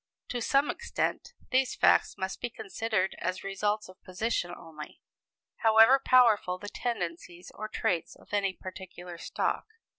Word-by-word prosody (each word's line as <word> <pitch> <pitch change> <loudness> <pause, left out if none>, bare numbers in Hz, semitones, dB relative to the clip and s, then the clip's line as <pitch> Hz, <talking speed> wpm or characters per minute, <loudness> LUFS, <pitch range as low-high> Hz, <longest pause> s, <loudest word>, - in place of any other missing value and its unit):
To 245 - -2
some 275 +5 +3
extent, 475 0 -3 0.2
these 260 0 +2
facts - - +4
must 190 0 -4
be 240 - -2
considered 215 -3 -2
as 185 - -2
results 205 +2 -1
of 185 0 -16
position 185 0 -2
only, 165 -3 -10 0.6
however 225 +3 +6
powerful 225 -7 +5
the 205 +2 -7
tendencies 175 -6 -4
or 215 - -5
traits 175 -5 -1
of - - -19
any 200 -2 +2
particular 180 -2 -9
stock. - - -2
205 Hz, 140 wpm, -29 LUFS, 180-230 Hz, 0.6 s, however